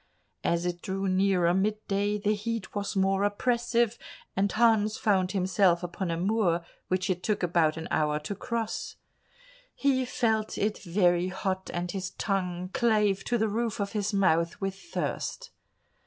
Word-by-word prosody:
As 170 Hz, +1 st, +1 dB
it 175 Hz, -1 st, -2 dB
drew 195 Hz, +1 st, -2 dB
nearer 185 Hz, -2 st, +3 dB
mid 205 Hz, +3 st, +1 dB
day, 205 Hz, +1 st, +1 dB
the 210 Hz, +1 st, +1 dB
heat 215 Hz, -1 st, -4 dB
was 205 Hz, 0 st, -3 dB
more 195 Hz, 0 st, +2 dB
oppressive, 235 Hz, +2 st, +1 dB, 0.4 s
and 195 Hz, +1 st, +1 dB
Hans 220 Hz, -2 st, +3 dB
found 185 Hz, -3 st, +1 dB
himself 185 Hz, -2 st, +2 dB
upon 175 Hz, +1 st, -3 dB
a 165 Hz, -, -1 dB
moor 180 Hz, -3 st, +1 dB, 0.2 s
which 185 Hz, 0 st, 0 dB
it 180 Hz, -1 st, -1 dB
took 210 Hz, 0 st, -1 dB
about 165 Hz, -3 st, +2 dB
an 160 Hz, -, -5 dB
hour 150 Hz, -1 st, +1 dB
to 155 Hz, +7 st, -4 dB
cross. 230 Hz, +1 st, -3 dB, 0.8 s
He 270 Hz, -2 st, +2 dB
felt 220 Hz, -3 st, 0 dB
it 210 Hz, +1 st, 0 dB
very 175 Hz, -1 st, +2 dB
hot 190 Hz, 0 st, -3 dB
and 175 Hz, 0 st, -3 dB
his 190 Hz, -1 st, -3 dB
tongue 185 Hz, -3 st, -2 dB
clave 215 Hz, -6 st, +2 dB
to 240 Hz, -, +1 dB
the 220 Hz, -1 st, +1 dB
roof 225 Hz, +1 st, -2 dB
of 200 Hz, 0 st, -2 dB
his 210 Hz, -1 st, -1 dB
mouth 170 Hz, -4 st, +2 dB
with 195 Hz, -1 st, -2 dB
thirst. 345 Hz, -, -4 dB
195 Hz, 160 wpm, -28 LUFS, 180-215 Hz, 0.8 s, nearer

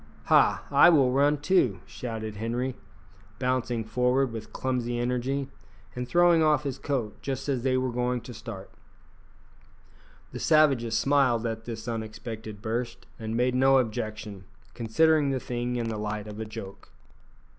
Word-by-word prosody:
"Ha! -, -, +4 dB
I 140 Hz, +5 st, +7 dB
will 140 Hz, -7 st, +4 dB
run 145 Hz, +3 st, +3 dB
too," 145 Hz, -, +2 dB
shouted 110 Hz, -3 st, -6 dB
Henri, 120 Hz, +4 st, -2 dB, 0.6 s
bouncing 125 Hz, -2 st, -1 dB
forward 125 Hz, +3 st, +1 dB
with 110 Hz, -1 st, -7 dB
clumsy 125 Hz, -2 st, -2 dB
energy, 125 Hz, +3 st, -1 dB, 0.5 s
and 125 Hz, 0 st, -4 dB
throwing 175 Hz, +1 st, +4 dB
off 155 Hz, -1 st, +3 dB
his 135 Hz, -3 st, -4 dB
coat 125 Hz, -7 st, -3 dB
just 135 Hz, 0 st, -4 dB
as 135 Hz, -4 st, 0 dB
they 130 Hz, 0 st, +1 dB
were 130 Hz, -1 st, 0 dB
going 125 Hz, 0 st, -1 dB
to 125 Hz, -, -9 dB
start. 105 Hz, -3 st, -9 dB, 1.6 s
The -, -, -6 dB
savages 135 Hz, -8 st, +3 dB
smiled 130 Hz, -5 st, +2 dB
at 115 Hz, -1 st, -4 dB
this 115 Hz, 0 st, -6 dB
unexpected 110 Hz, -2 st, -6 dB
burst, 115 Hz, +2 st, -3 dB
and 110 Hz, 0 st, -3 dB
made 125 Hz, +1 st, +2 dB
no 135 Hz, +1 st, +5 dB
objection, 110 Hz, -4 st, -3 dB, 0.3 s
considering 150 Hz, +6 st, +2 dB
the 135 Hz, -1 st, 0 dB
thing 120 Hz, 0 st, -3 dB
in 115 Hz, -2 st, -2 dB
the 110 Hz, -1 st, -4 dB
light 105 Hz, 0 st, -3 dB
of 105 Hz, 0 st, -8 dB
a 110 Hz, -, -3 dB
joke. 100 Hz, -2 st, -9 dB
125 Hz, 150 wpm, -27 LUFS, 110-135 Hz, 1.6 s, I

